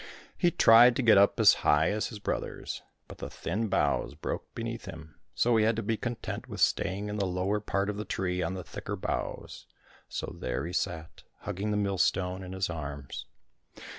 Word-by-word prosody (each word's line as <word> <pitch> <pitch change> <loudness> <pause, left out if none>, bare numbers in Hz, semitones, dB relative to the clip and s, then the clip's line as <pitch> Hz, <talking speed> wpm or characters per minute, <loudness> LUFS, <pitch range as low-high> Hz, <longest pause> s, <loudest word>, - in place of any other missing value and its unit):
He 175 - +3
tried 120 -5 +7
to 130 - 0
get 110 -4 +7
up 100 - +4
as - - +8
high 75 +3 +4
as 105 +1 -1
his 110 - -8
brothers, 105 - -4 0.3
but - - -11
the - - -5
thin 110 +6 -2
boughs - - 0
broke - - -5
beneath - - -4
him, 80 -1 -9 0.2
so 120 -1 +3
he 110 - +4
had 110 +1 +3
to 115 - -2
be 110 +2 0
content 120 +1 -5
with - - -6
staying 100 +2 +1
in 105 0 -3
the 100 - 0
lower 95 +3 0
part 100 -1 -1
of 105 0 -3
the 105 - -3
tree 90 -2 -2
on 95 - -2
the 90 - -5
thicker - - -6
boughs; - - -4 0.4
so - - -5
there 65 +1 -2
he 85 - -5
sat, 80 -3 -3 0.2
hugging 100 +4 -3
the 105 - +1
millstone 95 -2 +1
in 95 0 -7
his 95 -1 -1
arms. 70 -4 -6
100 Hz, 195 wpm, -29 LUFS, 90-110 Hz, 0.4 s, as